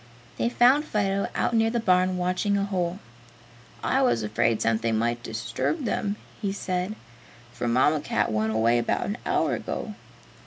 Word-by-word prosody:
They 235 - +2
found 250 +5 +4
Fido 200 -7 0
out - - 0
near 225 0 +3
the 235 +1 0
barn 185 -3 +2
watching 185 +3 0
a 200 - 0
hole. 180 -3 -2 0.9
"I 270 - +2
was 180 - +2
afraid 110 +1 +1
something 115 0 +1
might 120 +1 0
disturb 115 - -3
them," 205 -1 -1 0.3
he 200 -3 -1
said, 185 0 -2 0.6
"for 120 - -3
Mamma 130 +6 +3
Cat 140 - 0
went 110 0 0
away 115 +2 +3
about 120 - 0
an 205 - -4
hour - - +1
ago." - - -4
180 Hz, 160 wpm, -26 LUFS, -, 0.9 s, found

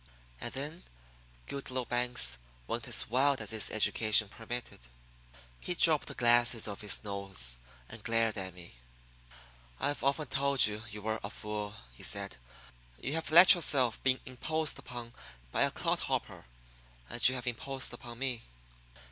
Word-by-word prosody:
And - - -4
then 150 +6 -5 0.6
Goodloe 130 -2 -4
Banks 120 - +1 0.3
went - - -4
as - - +1
wild 135 +3 +2
as 110 -1 -2
his 110 -1 +1
education 110 -1 +3
permitted. 120 +3 -6 0.8
He 180 - -2
dropped 160 -3 +5
the - - -7
glasses 120 -1 +3
off 100 +1 -6
his 105 0 0
nose 95 - -5 0.3
and 115 -2 -11
glared 115 -1 0
at 95 -3 -6
me. 85 -1 -12 1.1
"I've 145 - -2
often 140 +3 +1
told 140 0 +2
you 105 0 -3
you 105 -1 -9
were 110 0 -2
a 100 - -4
fool," 105 0 -5 0.2
he - - -15
said. - - -1 0.6
"You 135 - -4
have 160 0 -2
let 175 +4 +10
yourself 140 - +3
be 130 0 +2
imposed 155 +5 -3
upon 120 -1 -8 0.4
by - - -1
a - - +4
clodhopper. - - -3 0.6
And 120 - +5
you 130 - -3
have 125 - -5
imposed 130 +2 -4
upon 120 -3 -9
me." 125 -2 -2
120 Hz, 150 wpm, -31 LUFS, 105-135 Hz, 1.1 s, let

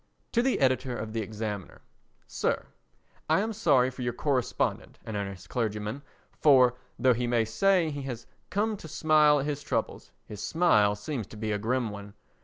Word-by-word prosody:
To 235 - +3
the 260 +1 +1
Editor 130 -1 +1
of 110 0 -5
the 115 - -1
Examiner. 105 -2 -5 0.5
Sir: - - -1 0.6
I - - +4
am 220 +2 -1
sorry 140 - +3
for 125 - -9
your 120 -1 -1
correspondent 130 -1 -1
"An 110 - -5
Earnest 100 -3 -5
Clergyman" 110 +1 -2 0.3
for, 130 -5 +5 0.2
though 130 0 +4
he 120 +1 -2
may 120 -2 +2
say 170 - +2
he 145 -1 -5
has 125 -4 -6 0.2
"come 215 +1 0
to 165 - -10
smile 150 -1 +4
at - - -3
his 145 -1 -3
troubles," - - -3 0.2
his 105 -1 -8
smile 105 -12 +3
seems 110 0 -5
to 110 - -12
be 110 0 -2
a 105 - -1
grim 120 +1 -1
one. 100 0 -9
125 Hz, 180 wpm, -28 LUFS, 110-150 Hz, 0.6 s, for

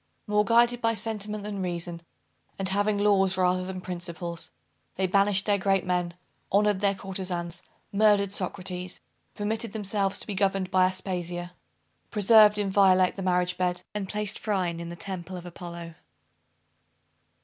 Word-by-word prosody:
More 210 0 +2
guided 235 +3 +3
by 230 0 +2
sentiment 210 -1 -1
than 205 -2 -4
reason, 175 -1 -3 0.6
and 195 - 0
having 205 +2 +1
laws 195 -2 +3
rather 185 0 +2
than 185 0 -6
principles, 170 -1 -5 0.5
they 190 - 0
banished 200 +1 +3
their 205 -1 +2
great 195 -1 +1
men, 180 -1 -1 0.4
honored 205 0 +3
their 200 0 +2
courtezans, 185 -3 -4 0.3
murdered 205 -1 +3
Socrates, 185 -2 -4 0.4
permitted 220 +1 -3
themselves 200 -2 -1
to - - -4
be 210 - -4
governed 195 -1 0
by 185 0 +5
Aspasia, 180 -2 -4 0.6
preserved 210 0 +6
inviolate 190 -2 +4
the 195 - -6
marriage 180 -1 +1
bed, 180 -1 0
and 200 -2 -4
placed 210 -1 -2
Phryne 185 -5 -1
in 170 0 -6
the 170 - -7
temple 185 0 -6
of 175 - -9
Apollo! 170 -1 -8
190 Hz, 145 wpm, -27 LUFS, 180-205 Hz, 0.6 s, preserved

